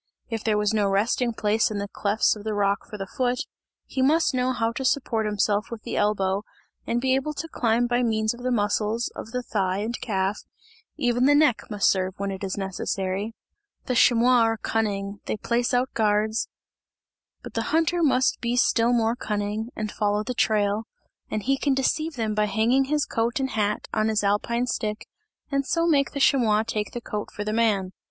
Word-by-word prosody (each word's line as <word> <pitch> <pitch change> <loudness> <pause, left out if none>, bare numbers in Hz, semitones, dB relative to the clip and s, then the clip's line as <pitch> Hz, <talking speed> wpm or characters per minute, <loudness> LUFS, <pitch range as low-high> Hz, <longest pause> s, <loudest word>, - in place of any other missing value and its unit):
If 225 -1 -3
there 215 -2 +1
was 210 0 +1
no 210 -2 +2
resting 225 +5 +1
place 220 0 +1
in 215 - -4
the 200 0 -3
clefts 205 +2 +1
of 210 - -10
the 215 -1 -2
rock 200 +1 0
for 210 - -7
the 195 - -4
foot, 245 +4 -1 0.4
he 265 - -3
must 305 +3 +3
know 255 0 +1
how 230 -2 0
to 250 +3 -5
support 235 -4 0
himself 210 0 0
with 230 -2 -7
the - - -4
elbow, 195 -2 +1 0.5
and 235 - +1
be 260 +1 +1
able 270 +3 -1
to 330 - -4
climb 235 -5 +1
by 240 0 +1
means 220 -2 +1
of 240 - -11
the 255 - -1
muscles 215 0 0
of - - -7
the 250 +1 -3
thigh 190 -5 -1
and 220 +3 -3
calf, 195 -2 -1 0.6
even 245 0 +2
the 290 +1 +5
neck 290 -6 +3
must 210 -2 +1
serve 185 -1 +1
when 200 0 -2
it 190 0 -6
is 195 0 -3
necessary. 195 +2 -3 0.5
The 255 - -1
chamois 245 +1 +5
are 225 -1 +2
cunning, 200 -2 -2
they - - -1
place 240 +3 0
out 250 +1 +1
guards 215 0 +1 1.0
but - - -9
the - - -2
hunter 330 +2 +2
must 265 -5 +2
be 235 0 0
still 240 -1 +3
more 230 -1 +2
cunning 210 0 -3
and 215 -1 -3
follow 210 0 0
the 250 - -3
trail 210 -1 +1 0.4
and 215 - -3
he 270 +3 +1
can 280 -2 +1
deceive 310 +4 0
them 220 -3 -1
by 210 0 +2
hanging 235 +6 +2
his 295 +1 0
coat 230 +3 -1
and 265 -1 -1
hat 210 -1 -1
on 215 0 +1
his 215 -1 +1
alpine 220 +4 +1
stick, 215 -3 -3 0.5
and 275 0 +1
so 335 0 +1
make 285 -5 +2
the 280 - -3
chamois 225 -6 +3
take 210 -1 -3
the 240 - -5
coat 210 -2 -5
for 205 - -5
the 215 +1 -2
man. 210 -5 +1
225 Hz, 205 wpm, -25 LUFS, 210-250 Hz, 1.0 s, the